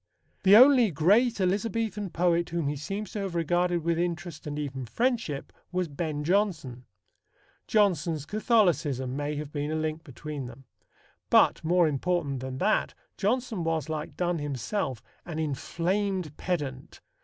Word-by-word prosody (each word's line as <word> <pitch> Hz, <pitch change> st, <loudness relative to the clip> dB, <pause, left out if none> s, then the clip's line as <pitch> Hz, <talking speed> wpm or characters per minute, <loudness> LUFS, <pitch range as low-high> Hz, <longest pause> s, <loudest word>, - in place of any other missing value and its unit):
The 195 Hz, +1 st, +7 dB
only 255 Hz, -2 st, +7 dB
great 205 Hz, -, +3 dB
Elizabethan 205 Hz, +1 st, -1 dB
poet 170 Hz, 0 st, +1 dB
whom 170 Hz, -3 st, -1 dB
he 145 Hz, -, -1 dB
seems 195 Hz, +8 st, -5 dB
to 210 Hz, -, -4 dB
have 195 Hz, -3 st, -4 dB
regarded 175 Hz, +1 st, +1 dB
with 170 Hz, 0 st, 0 dB
interest 175 Hz, -2 st, -3 dB
and 145 Hz, 0 st, -4 dB
even 135 Hz, -4 st, -4 dB
friendship 230 Hz, -, -1 dB, 0.2 s
was 180 Hz, -1 st, 0 dB
Ben 150 Hz, 0 st, -3 dB
Jonson. 160 Hz, -, 0 dB, 0.8 s
Jonson's 170 Hz, -8 st, +2 dB
Catholicism 170 Hz, -, +1 dB
may 145 Hz, +1 st, -2 dB
have 150 Hz, 0 st, -5 dB
been 145 Hz, 0 st, -3 dB
a 155 Hz, -, -1 dB
link 155 Hz, 0 st, -2 dB
between 145 Hz, -1 st, -7 dB
them. 125 Hz, +3 st, -12 dB, 0.7 s
But, -, -, +4 dB
more 175 Hz, +1 st, +4 dB
important 150 Hz, -1 st, -1 dB
than 130 Hz, 0 st, -5 dB
that, 215 Hz, +10 st, +1 dB, 0.2 s
Jonson 220 Hz, -2 st, -1 dB
was, 160 Hz, -1 st, -1 dB
like 155 Hz, -1 st, -4 dB
Donne 175 Hz, -2 st, 0 dB
himself, 135 Hz, -, -3 dB, 0.2 s
an 170 Hz, -3 st, -6 dB
inflamed 175 Hz, +3 st, -1 dB
pedant. 145 Hz, -7 st, -4 dB
170 Hz, 145 wpm, -28 LUFS, 145-195 Hz, 0.8 s, The